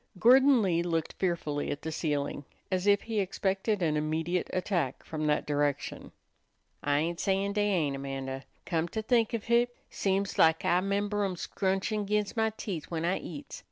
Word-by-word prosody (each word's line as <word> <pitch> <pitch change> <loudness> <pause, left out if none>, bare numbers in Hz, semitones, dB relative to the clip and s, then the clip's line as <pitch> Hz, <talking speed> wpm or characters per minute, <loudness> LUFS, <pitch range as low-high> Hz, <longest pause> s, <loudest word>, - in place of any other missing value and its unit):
Gordon 255 +3 +6
Lee 170 -3 +2
looked 165 -2 -1
fearfully 165 -5 -1
at 145 - -4
the 160 - -3
ceiling, 145 -3 -2 0.3
as 185 +1 0
if 205 0 +4
he 225 -2 -2
expected 195 +1 0
an 155 -2 +2
immediate 160 +4 -1
attack 175 -8 -1
from 155 -1 -3
that 150 0 +1
direction. 145 -1 -1 0.7
"I 145 0 +1
ain't 165 +3 -1
sayin' 195 0 +1
dey 205 0 +1
ain't, 155 -8 +1
Amanda. 135 -1 -5 0.2
Come 165 -1 0
to 220 +5 -4
think 230 0 +2
of 220 - -4
hit, 240 +1 +2 0.2
seems 195 0 -1
lak 160 0 +5
I 180 +1 +3
'member 205 +1 0
'em 190 -2 -1
scrunchin' 195 +3 -1
'g'inst 210 +1 0
my 220 -1 +2
teeth 195 -7 -5
when 165 -1 -2
I 180 +2 +1
eats. 145 -4 -8
180 Hz, 175 wpm, -30 LUFS, 155-205 Hz, 0.7 s, Gordon